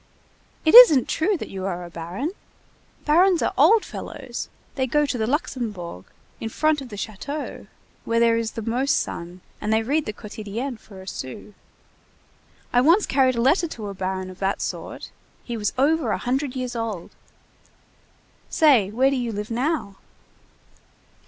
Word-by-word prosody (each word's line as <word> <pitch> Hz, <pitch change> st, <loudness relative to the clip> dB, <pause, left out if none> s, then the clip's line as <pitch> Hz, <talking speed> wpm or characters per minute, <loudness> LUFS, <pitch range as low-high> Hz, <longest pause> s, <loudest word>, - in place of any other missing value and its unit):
It 315 Hz, -, +4 dB
isn't 390 Hz, -, +10 dB
true 375 Hz, +5 st, +1 dB
that -, -, -7 dB
you 190 Hz, -1 st, -5 dB
are 175 Hz, -2 st, -4 dB
a -, -, -10 dB
baron? 175 Hz, -, -4 dB, 0.7 s
Barons 345 Hz, +4 st, +4 dB
are -, -, 0 dB
old 450 Hz, -2 st, +5 dB
fellows, 260 Hz, -4 st, -7 dB, 0.2 s
they 260 Hz, -3 st, -1 dB
go 295 Hz, +4 st, +2 dB
to 275 Hz, -, -2 dB
the 220 Hz, -2 st, -1 dB
Luxembourg, 215 Hz, -, -3 dB, 0.3 s
in 225 Hz, -, -4 dB
front 310 Hz, +4 st, +1 dB
of 260 Hz, -, -9 dB
the 210 Hz, -, -8 dB
château, 220 Hz, +9 st, -6 dB, 0.4 s
where 230 Hz, 0 st, +1 dB
there 230 Hz, -1 st, +4 dB
is 230 Hz, -1 st, -2 dB
the 225 Hz, -, -5 dB
most 255 Hz, +6 st, +1 dB
sun, 175 Hz, +2 st, -6 dB, 0.2 s
and 210 Hz, -, -1 dB
they 220 Hz, 0 st, +2 dB
read 290 Hz, +6 st, 0 dB
the -, -, -1 dB
Quotidienne 215 Hz, +4 st, -6 dB
for 195 Hz, -3 st, -13 dB
a -, -, -16 dB
sou. 130 Hz, +5 st, -7 dB, 1.2 s
I 245 Hz, -, +5 dB
once 335 Hz, +10 st, +5 dB
carried 260 Hz, -2 st, +2 dB
a 235 Hz, -, 0 dB
letter 320 Hz, +8 st, +3 dB
to 220 Hz, -9 st, -7 dB
a -, -, -5 dB
baron 185 Hz, 0 st, -4 dB
of 185 Hz, -, -14 dB
that 195 Hz, 0 st, 0 dB
sort. -, -, -5 dB, 0.3 s
He 240 Hz, -, -5 dB
was 210 Hz, -2 st, -1 dB
over 310 Hz, +4 st, +2 dB
a -, -, +1 dB
hundred 265 Hz, +2 st, -2 dB
years 255 Hz, -1 st, -4 dB
old. 225 Hz, -7 st, -4 dB, 1.4 s
Say, 265 Hz, -11 st, +4 dB
where 260 Hz, +6 st, +2 dB
do -, -, 0 dB
you 240 Hz, -2 st, -2 dB
live 210 Hz, +1 st, -5 dB
now?" 245 Hz, -5 st, -1 dB
240 Hz, 170 wpm, -23 LUFS, 205-285 Hz, 1.4 s, isn't